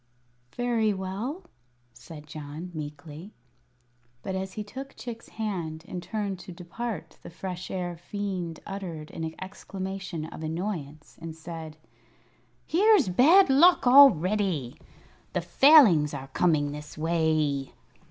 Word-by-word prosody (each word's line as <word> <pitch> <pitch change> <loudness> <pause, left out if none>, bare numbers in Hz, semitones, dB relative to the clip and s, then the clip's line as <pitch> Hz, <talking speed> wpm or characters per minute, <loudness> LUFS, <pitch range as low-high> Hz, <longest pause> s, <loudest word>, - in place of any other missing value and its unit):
"Very 230 -4 +1
well," 200 - -4 0.5
said 150 +5 -12
John, 155 +3 -8
meekly. 155 +4 -8 0.9
But 190 - -4
as 190 0 -4
he 215 - -4
took 265 +6 -9
Chick's 230 -2 -8
hand 175 -7 -4
and 180 - -5
turned 200 -1 -3
to 180 - -10
depart 175 0 -6
the - - -10
Fresh 180 +1 -6
Air 175 -2 -3
Fiend 180 -2 -5
uttered 175 -6 -6
an 160 0 -5
exclamation 190 -3 -6
of 160 - -9
annoyance, 160 -3 -5
and 165 -1 -7
said: 160 -1 -8 0.9
"Here's 390 - +4
bad 315 - +6
luck 345 +5 +6
already! 195 - +5 0.5
The - - 0
Failings 215 - +6
are 135 -1 -7
coming 150 -5 +1
this 150 +1 -9
way." 155 -4 0
180 Hz, 120 wpm, -27 LUFS, 155-210 Hz, 0.9 s, bad